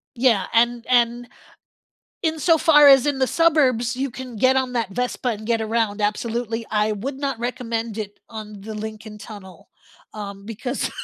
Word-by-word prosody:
Yeah, 230 -6 +3
and 235 +1 +2
and, 240 -1 +2 1.0
insofar 320 -2 +5
as 270 -2 +7
in 285 -2 0
the 260 - +2
suburbs, 260 -6 +2
you 270 +2 -2
can 255 0 -8
get 255 +5 +3
on 260 -1 0
that 230 -5 -1
Vespa 250 +3 -2
and 215 -2 -4
get 230 0 0
around, 220 -1 -1
absolutely. 225 +2 -2
I 210 0 +1
would 260 +7 -5
not 275 -4 -2
recommend 230 -2 -3
it 205 -2 -6
on 215 -2 -9
the 220 +2 -7
Lincoln 215 0 -7
Tunnel, 190 -5 -12 0.4
um, 200 -2 -8
because, 240 +4 -3
235 Hz, 160 wpm, -22 LUFS, 215-255 Hz, 1.0 s, as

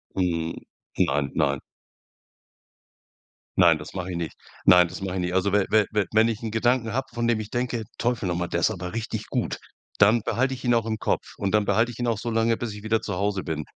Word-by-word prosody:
Hm. 85 -3 0 0.4
Nein, 70 0 +1
nein. - - +1 2.0
Nein, - - +6
das - - -10
mach 90 -1 -4
ich 90 - -4
nicht. 85 -2 -4 0.3
Nein, 90 -1 +7
das 95 +2 -8
mach 95 -2 -3
ich 95 - -2
nicht. 90 0 -2
Also 95 +2 +1
we 105 -2 +3
we 110 -2 +4
we 105 -2 +1
wenn 110 +1 +4
ich 115 0 -2
‘n 115 - -3
Gedanken 115 +1 +1
habe, 135 +1 -1
von 120 0 -1
dem 115 -2 +2
ich 110 0 -6
denke: 120 -2 -1 0.2
„Teufel 120 -5 0
noch 85 - 0
mal, 90 0 -1
der 85 - -1
ist 110 - +3
aber 90 -1 -5
richtig 110 -1 -4
gut!”, - - -2 0.4
dann 105 +3 +5
behalte 130 +2 0
ich 125 - -11
ihn 120 - +3
auch 115 -1 +1
im 110 - -1
Kopf - - -2
und 100 0 -2
dann 105 -1 +4
behalte 110 +4 +2
ich 120 - -12
ihn 120 - -1
auch 115 -3 +1
so 120 +1 -4
lange, 115 0 +2
bis 115 -3 -4
ich 105 - -9
wieder 110 +1 +1
zu 100 - -4
Hause 100 +1 -1
bin. 80 -2 -3
105 Hz, 240 wpm, -25 LUFS, 90-115 Hz, 2.0 s, Nein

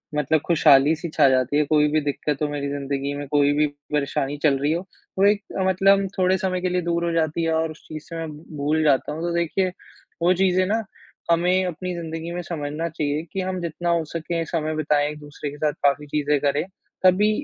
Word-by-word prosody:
मतलब 150 +2 +2
खुशहाली-सी 155 0 +4
छा 145 -3 +5
जाती 130 +2 +2
है। 150 - +4
कोई 150 0 +3
भी 155 0 +2
दिक्कत 145 0 -2
हो 150 - +2
मेरी 145 -1 -3
ज़िंदगी 140 0 -3
में, 145 0 -5
कोई 145 0 +3
भी 150 +1 +3 0.3
परेशानी 145 -1 -1
चल 145 -3 +4
रही 145 +2 +1
हो, 175 +3 -3 0.3
वो 195 - +5
एक 205 0 +4 0.3
मतलब 195 +1 +4
थोड़े 185 0 +3
समय 185 -2 -1
के 185 - 0
लिए 180 0 0
दूर 170 0 -1
हो 170 - 0
जाती 165 0 0
है 165 0 +1
और 160 0 0
उस 155 - -13
चीज़ 155 -1 -7
से 165 - -7
मैं 165 -1 -4 0.3
भूल 150 +2 +1
जाता 145 -3 +2
हूँ। 155 +2 -5
तो 175 0 -1
देखिए, 170 +2 0 0.5
वो 175 +2 +4
चीज़ें 185 0 +2
ना 220 +4 0 0.5
हमें 180 +2 +3
अपनी 180 +1 -4
ज़िंदगी 165 0 -5
में 175 - -3
समझना 160 -1 -4
चाहिए 150 -2 -2
कि 195 - -1
हम 185 0 -3
जितना 170 +1 -3
हो 170 -1 +2
सके 165 0 -2
समय 155 -1 -2
बिताएँ 150 -1 +1
एक-दूसरे 150 -1 -7
के 145 - -10
साथ 150 0 0
काफ़ी 140 +1 +2
चीज़ें 145 0 +1
करें, 145 +1 +1 0.4
तभी 185 +3 +5
160 Hz, 215 wpm, -23 LUFS, 145-175 Hz, 0.5 s, छा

